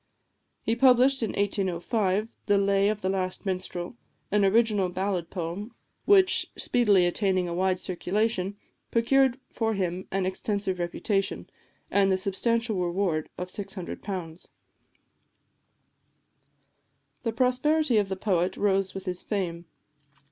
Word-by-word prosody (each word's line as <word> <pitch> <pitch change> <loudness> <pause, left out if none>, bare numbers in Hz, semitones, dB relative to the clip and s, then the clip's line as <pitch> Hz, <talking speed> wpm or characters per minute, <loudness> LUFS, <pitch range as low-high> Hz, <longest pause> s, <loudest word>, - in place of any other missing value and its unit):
He 225 - +1
published 260 +2 +5
in 225 - 0
1805 200 +1 0 0.2
"The 205 - +4
Lay 200 0 +3
of 210 -1 -2
the 185 - -1
Last 185 0 -2
Minstrel," 185 0 -4 0.4
an 210 -1 +3
original 205 -2 +3
ballad 185 -2 -2
poem, 190 +6 -5 0.3
which, 385 -2 +5
speedily 205 -7 +3
attaining 185 0 +1
a 170 - -3
wide 185 +1 +1
circulation, 195 +2 -1 0.3
procured 260 +2 +3
for 225 -1 -1
him 185 -1 -2
an 195 -1 -1
extensive 190 0 -2
reputation, 195 +3 -2 0.4
and 195 -1 +3
the 190 - +3
substantial 225 +3 0
reward 175 -3 -1
of 180 0 -5
£600. 185 -3 -6 2.7
The 230 - -1
prosperity 255 +3 +2
of 200 -2 -1
the 190 - -2
poet 185 -2 0
rose 195 -2 +1
with 195 0 -6
his 180 -1 -4
fame. 175 -5 -3
195 Hz, 120 wpm, -27 LUFS, 185-220 Hz, 2.7 s, published